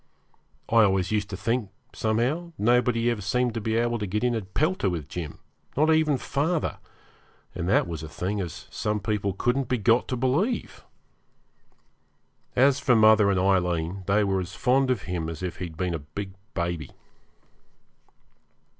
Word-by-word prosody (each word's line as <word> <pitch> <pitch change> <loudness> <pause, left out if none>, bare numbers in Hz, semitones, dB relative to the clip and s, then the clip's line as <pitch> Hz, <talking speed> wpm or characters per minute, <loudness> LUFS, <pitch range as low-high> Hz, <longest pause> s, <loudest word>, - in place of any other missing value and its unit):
I 115 - +1
always 95 -2 +2
used 105 -2 0
to 95 - -5
think, 115 +2 -1 0.2
somehow, 130 +11 -1
nobody 120 +1 +2
ever 110 -3 -3
seemed 125 +4 0
to 115 - -3
be 110 +1 -1
able 120 0 +1
to 105 - -3
get 105 +5 -2
into 120 -2 +1
a - - -7
pelter 125 - 0
with 80 -5 -4
Jim, 80 -5 -6 0.4
not 155 +2 +4
even 155 -3 +3
father, 155 +6 -1 0.7
and 90 0 -3
that 100 - +3
was 80 -2 -5
a 80 - -7
thing 95 +5 -2
as 90 +2 -6
some 105 -1 -1
people 100 -1 -1
couldn't 120 +6 0
be 125 - +2
got 115 +2 +3
to 125 - -2
believe. 155 - -1 1.7
As 135 +2 +4
for 125 -3 +3
mother 110 -2 +6
and 95 -2 +2
Aileen, 90 -1 +1
they 105 +2 +3
were 95 -1 +1
as 90 - -7
fond 135 +1 +2
of 130 - 0
him 85 -3 -3
as 80 +1 -7
if 90 - -4
he'd 85 -4 -6
been 90 0 -1
a 80 - -2
big 95 +7 -7 0.2
baby. 85 -4 -2
105 Hz, 170 wpm, -26 LUFS, 90-125 Hz, 1.7 s, mother